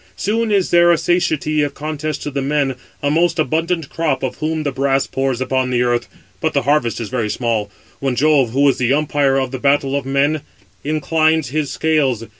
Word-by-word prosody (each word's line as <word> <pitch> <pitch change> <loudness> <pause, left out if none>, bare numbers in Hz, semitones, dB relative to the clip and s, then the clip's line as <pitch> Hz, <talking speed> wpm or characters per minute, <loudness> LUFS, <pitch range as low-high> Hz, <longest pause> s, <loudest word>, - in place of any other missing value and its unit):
Soon 220 +2 -1
is 195 -3 +1
there 175 0 +5
a 170 - +4
satiety 155 -3 0
of 145 -1 -2
contest 155 0 -4
to 145 - -4
the 140 0 -2
men, 140 -1 0 0.3
a 145 - +1
most 165 +2 +2
abundant 160 +1 0
crop 150 -5 -1
of 130 - -3
whom 155 0 -2
the 145 - -1
brass 135 0 +1
pours 135 -2 -2
upon 130 0 0
the 125 -1 +1
earth; 120 -1 0 0.3
but - - -1
the - - +1
harvest 140 -3 +1
is 115 - -5
very 120 -4 -2
small, 110 -3 -1 0.3
when 135 -2 -1
Jove, 140 -2 +3
who 140 +5 +2
is 135 - +2
the 125 +1 +2
umpire 145 -2 +1
of 130 -2 -1
the 130 - -5
battle 140 0 +1
of 140 - -1
men, 140 +3 +1 0.4
inclines 155 0 +1
his 150 0 -1
scales. 140 -8 0
140 Hz, 205 wpm, -18 LUFS, 130-155 Hz, 0.4 s, there